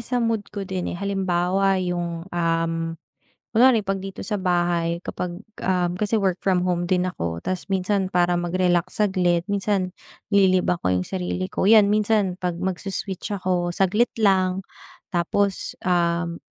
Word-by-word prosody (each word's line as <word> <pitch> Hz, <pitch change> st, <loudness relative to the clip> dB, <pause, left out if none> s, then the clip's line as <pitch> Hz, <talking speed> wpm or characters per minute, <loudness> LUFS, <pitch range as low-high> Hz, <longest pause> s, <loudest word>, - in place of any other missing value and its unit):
sa 245 Hz, +2 st, -2 dB
mood 225 Hz, -3 st, 0 dB
ko 205 Hz, -2 st, -5 dB
din 185 Hz, -2 st, -3 dB
eh. -, -, -5 dB
Halimbawa 195 Hz, 0 st, +1 dB
yung, 175 Hz, -2 st, -3 dB
um, 165 Hz, -1 st, 0 dB, 0.8 s
kunwari 235 Hz, -1 st, +5 dB
pag 195 Hz, 0 st, -2 dB
dito 195 Hz, 0 st, -7 dB
sa 210 Hz, -, -2 dB
bahay, 175 Hz, -2 st, +1 dB
kapag, 175 Hz, -1 st, -4 dB, 0.2 s
um, 180 Hz, -2 st, +1 dB
kasi 210 Hz, +2 st, 0 dB
work 190 Hz, -2 st, 0 dB
from 185 Hz, -2 st, +2 dB
home 175 Hz, -1 st, 0 dB
din 180 Hz, 0 st, +2 dB
ako. 85 Hz, -, -3 dB
Ta's 185 Hz, -1 st, -3 dB
minsan 190 Hz, 0 st, +1 dB
para 175 Hz, -1 st, +2 dB
mag-relax 175 Hz, 0 st, 0 dB
saglit. 180 Hz, -4 st, +2 dB
Minsan, 195 Hz, -2 st, 0 dB, 0.4 s
nililibang 185 Hz, -3 st, +3 dB
ko -, -, -2 dB
yung 90 Hz, 0 st, 0 dB
sarili 185 Hz, 0 st, -3 dB
ko, -, -, -1 dB
yan. 215 Hz, -2 st, +7 dB
Minsan 210 Hz, -3 st, +2 dB
pag 180 Hz, -2 st, -2 dB
mag-su-switch 190 Hz, +2 st, -3 dB
ako 180 Hz, -1 st, 0 dB
saglit 210 Hz, +5 st, +2 dB
lang, 190 Hz, -2 st, +2 dB, 0.5 s
tapos, 190 Hz, +3 st, 0 dB
um, 170 Hz, -1 st, +1 dB
185 Hz, 150 wpm, -23 LUFS, 175-195 Hz, 0.8 s, yan